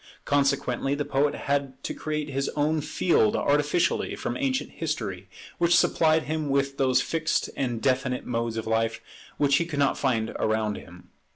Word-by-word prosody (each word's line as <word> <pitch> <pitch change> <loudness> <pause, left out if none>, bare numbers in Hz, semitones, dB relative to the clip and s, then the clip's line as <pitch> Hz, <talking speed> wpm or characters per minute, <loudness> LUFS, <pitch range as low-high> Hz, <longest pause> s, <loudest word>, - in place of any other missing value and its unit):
Consequently 140 -1 +1
the 145 0 -2
poet 145 +1 +1
had 140 -2 -1
to - - -3
create 150 -1 -3
his 135 0 -1
own 150 +1 +1
field 145 - +2
artificially 150 +4 +1
from - - -3
ancient 270 -2 -1
history, 100 - -4 0.3
which 170 0 +4
supplied 160 -1 +3
him 155 -1 -2
with 140 0 0
those 130 -1 +3
fixed 165 -1 -1
and 120 -4 -2
definite 130 -1 0
modes 115 -1 -2
of 110 - -3
life 115 0 0 0.4
which 140 -1 +3
he 170 - 0
could 155 -4 -5
not 140 -1 +2
find 115 -5 0
around 110 -1 0
him. 90 0 -12
140 Hz, 165 wpm, -26 LUFS, 120-150 Hz, 0.4 s, which